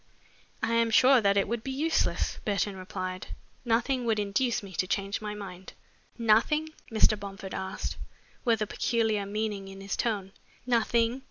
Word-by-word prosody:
"I 225 +1 +1
am 230 0 +3
sure 255 +3 +6
that 200 -1 +3
it 200 - +3
would 230 +1 -2
be - - -4
useless," 305 +5 0
Burton 205 -1 0
replied. 185 0 -5 0.4
"Nothing 245 +2 +1
would 225 -2 +2
induce 210 +4 0
me 195 -1 -9
to 185 - +1
change 195 +2 -1
my 210 -1 -4
mind." 190 -2 -9 0.4
"Nothing?" 235 +8 +3 0.2
Mr. 215 -1 +4
Bomford 195 -1 -7
asked, 190 0 -4 0.5
with 225 -3 +2
a - - -1
peculiar 220 -2 0
meaning 205 -1 -2
in 195 0 -9
his 195 0 -3
tone. 205 -5 -1 0.3
"Nothing?" 235 0 +2
215 Hz, 160 wpm, -29 LUFS, 195-235 Hz, 0.5 s, sure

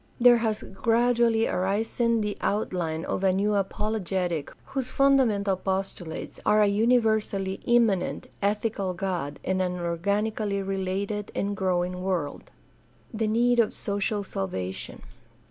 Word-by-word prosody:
There 240 0 +7
has 220 -2 -1
gradually 230 +2 +2
arisen 225 +4 0
the 210 -1 -2
outline 175 -5 -1
of 190 - -2
a 190 - +4
new 200 +3 +1
apologetic 190 -5 -1
whose 270 -2 -3
fundamental 235 -8 +3
postulates 190 -3 -4
are 210 - +4
a 210 - +6
uni 225 +5 +4
versally 210 -4 -1
immanent, 230 -6 +2 0.2
ethical 205 -2 -1
God 170 -6 -3
and 185 0 0
an 180 -1 0
organically 200 +4 -1
related 195 +2 -2
and 200 +1 -1
growing 180 -1 -1
world. 180 -6 -3 0.6
The 220 0 0
need 240 +2 +3
of 225 - +2
social 205 +1 -1
salvation. 95 - -5
200 Hz, 125 wpm, -26 LUFS, 185-220 Hz, 0.6 s, There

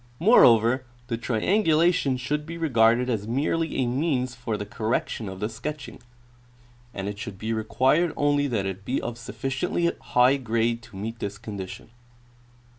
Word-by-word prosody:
Moreover, 130 - +5 0.3
the 115 - 0
triangulation 155 - +2
should 150 +4 -3
be 165 +1 -6
regarded 120 -6 +3
as 110 -4 -2
merely 155 +7 -1
a 130 - +1
means 130 0 0
for 115 -2 -4
the 105 - -5
correction 110 0 -2
of 95 0 -8
the 105 - -1
sketching, 135 +6 -7 0.9
and 100 -3 -5
it 105 0 -5
should 105 -2 -6
be 110 +3 -3
required 130 +9 +2
only 145 0 +2
that 110 -7 -1
it 95 0 -5
be 125 +6 -1
of 120 0 -5
sufficiently 135 +7 -1
high 125 +3 +3
grade 115 -2 0
to 115 -3 -15
meet 110 +4 -5
this 100 -1 -4
condition. 100 -3 -8
120 Hz, 155 wpm, -25 LUFS, 110-145 Hz, 0.9 s, Moreover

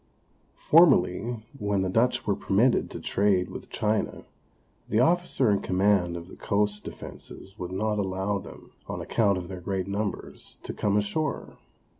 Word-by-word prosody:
Formerly, 120 - +4
when 100 -2 0
the - - 0
Dutch 120 +4 +2
were 100 - +1
permitted 105 +5 +2
to - - -7
trade 95 -3 +1
with - - -8
China, 105 0 -1 0.6
the 110 - +2
officer 165 -4 +3
in 100 - +2
command 95 -2 +2
of 85 0 -9
the - - -12
coast 105 0 0
defences 95 +2 -10
would 90 -1 -5
not 105 +2 -1
allow 95 +1 -1
them, - - -12 0.2
on - - -4
account 100 -4 +1
of 90 -1 -5
their 95 -1 -7
great 95 0 -2
numbers, 100 +1 -4
to - - -5
come 105 0 +1
ashore. 140 +9 -2
100 Hz, 155 wpm, -27 LUFS, 95-110 Hz, 0.6 s, Formerly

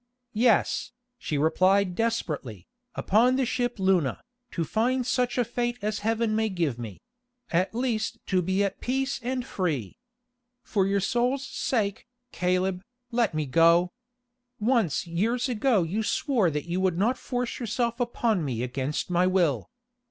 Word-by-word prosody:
"Yes," 230 +2 +2 0.3
she 150 - -2
replied 185 +5 +3
desperately, 150 - -2 0.3
"upon 235 +6 +3
the 265 -1 +1
ship 245 0 -1
Luna, 190 -8 +2 0.3
to 170 - -2
find 245 - 0
such 250 0 0
a 245 - +2
fate 240 +1 -2
as 215 0 -1
Heaven 225 0 0
may 220 0 +1
give 165 - -1
me; 110 -5 -7 0.5
at 185 +5 +1
least 240 -3 -1
to 185 -2 +1
be 190 +3 +1
at 200 - -3
peace 270 +2 -1
and 250 +1 -2
free. 150 - -2 0.7
For 195 -3 +1
your 200 0 +1
soul's 245 +7 0
sake, 215 -6 -2 0.2
Caleb, 180 0 0 0.3
let 230 -8 +1
me 155 -1 0
go. 170 +5 +4 0.7
Once 215 - +1
years 220 +10 0
ago 240 -4 +2
you 190 +7 -2
swore 225 - +1
that 150 -1 -3
you 175 +2 -2
would 185 -3 +1
not 225 +7 +2
force 245 -2 -3
yourself 235 0 -1
upon 235 -6 0
me 125 -5 -2
against 135 +7 -3
my 180 +1 +3
will. 175 -8 +1
200 Hz, 150 wpm, -27 LUFS, 170-240 Hz, 0.7 s, go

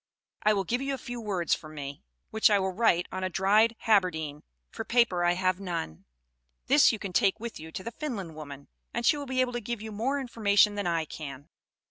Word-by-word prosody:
I 215 - +4
will 195 - 0
give 245 +7 -1
you 275 0 -1
a - - -8
few 240 -1 -7
words 190 -6 0
from 155 0 -5
me, 140 -1 -7 0.3
which 220 - +4
I 205 - +4
will 190 -1 0
write 180 -3 +2
on 185 0 -4
a 185 - 0
dried 210 +5 +3
haberdine, 160 -9 +1 0.3
for - - -5
paper 235 -8 +2
I 175 0 +4
have 185 +1 0
none; 170 - -5 0.6
this 285 +2 +6
you 225 - -3
can 195 -3 -6
take 200 +1 +3
with 235 0 -6
you 160 +1 -9
to 185 - -6
the 230 - -5
Finland 230 - -5
woman, 140 -2 -9 0.3
and 235 0 -1
she - - +5
will 285 -1 -6
be 255 0 +1
able 250 -1 0
to 240 - -3
give 235 +1 -4
you 220 +1 -7
more 250 +7 -1
information 210 -5 +3
than 205 -3 -2
I 165 -2 0
can." 145 -1 -8
200 Hz, 225 wpm, -28 LUFS, 170-235 Hz, 0.6 s, this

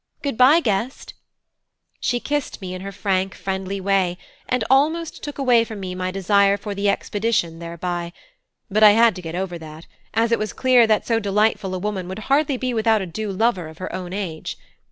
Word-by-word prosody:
Good 280 -4 -1
bye, 270 +8 +6
guest." 230 +1 -2 0.9
She 245 - 0
kissed 290 +2 -3
me 185 -3 -6
in 185 - -6
her 195 +1 -6
frank 195 -1 -1
friendly 190 0 -3
way, 190 -2 +1 0.3
and 250 -2 +1
almost 310 +5 +1
took 290 - -6
away 250 -4 +4
from 220 -2 -7
me 185 -1 -5
my 185 0 -3
desire 200 +1 +3
for 205 0 -5
the 200 0 0
expedition 200 -6 -1
thereby; 170 0 -4 0.6
but 215 -1 0
I 210 -1 +9
had 230 -1 +5
to - - -6
get 165 -1 -6
over 180 -2 -3
that, 155 0 -11 0.3
as 230 +1 +2
it 230 - +3
was 215 0 -3
clear 250 -3 +4
that 215 -1 +2
so 230 -1 +1
delightful 205 -2 +1
a - - -2
woman 190 -1 -3
would 190 +2 -6 0.2
hardly 285 -2 +2
be 255 0 -2
without 220 -2 +2
a - - -4
due 200 +4 -4
lover 195 -4 0
of 160 0 -12
her 185 0 -6
own 180 -1 -5
age. 185 -5 -5
200 Hz, 200 wpm, -22 LUFS, 185-230 Hz, 0.9 s, I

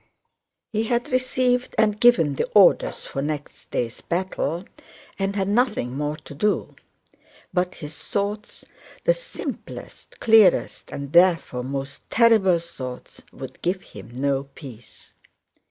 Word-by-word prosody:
He 220 +1 0
had 240 +2 -1
received 255 -1 +1
and 210 -1 +3
given 175 -12 +5
the - - -1
orders 200 -3 +5
for 135 - -4
next 150 0 -5
day's 120 -1 -3
battle 175 -1 -2 0.5
and 195 +1 -1
had 195 -2 0
nothing 205 - +1
more 150 +1 -2
to 150 - -12
do. 205 +9 -1 0.8
But 180 0 0
his 150 0 -8
thoughts—the 210 - -3
simplest, - - -8
clearest, 220 -5 +4
and 140 0 -6
therefore 170 -8 +4
most 140 +2 -5
terrible 220 -6 +5
thoughts—would 130 -4 -9
give 185 +2 -1
him - - -12
no 135 +2 -1
peace. 130 -5 -13
180 Hz, 120 wpm, -23 LUFS, 140-215 Hz, 0.8 s, given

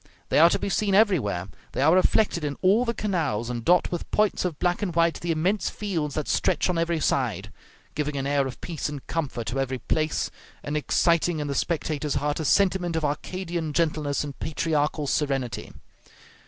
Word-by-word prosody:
They - - +3
are 165 +2 +8
to - - +1
be - - -3
seen 195 0 +1
everywhere; 140 - +2 0.3
they 130 - 0
are 160 +3 +5
reflected 185 -1 +3
in 145 -1 -3
all 205 +7 +4
the 235 - 0
canals, 150 - -1
and 120 -1 -4
dot 180 +5 +3
with 175 - -4
points 210 -1 +1
of 175 -5 -2
black 175 +4 0
and 180 -5 -2
white 170 0 +2
the 175 - -5
immense 180 +6 +1
fields 165 -9 -3
that 155 - -2
stretch - - +1
on 170 - -1
every 170 -1 0
side, - - -1 0.4
giving 150 -1 -2
an 135 - -2
air 140 -1 +1
of 130 - -8
peace 165 -4 -3
and 145 -2 -7
comfort 135 -8 -3
to 120 +5 -2
every 130 -1 -1
place, 155 +5 -1 0.3
and 145 - -3
exciting 170 +2 +2
in 150 - -2
the 140 - -2
spectator's 150 -1 -1
heart 145 +2 -1
a 160 - -2
sentiment 185 -1 +2
of 160 -2 0
Arcadian 165 +1 -3
gentleness 150 -3 0
and 145 -2 -8
patriarchal 150 -1 -1
serenity. 135 -6 -1
155 Hz, 195 wpm, -25 LUFS, 145-175 Hz, 0.4 s, are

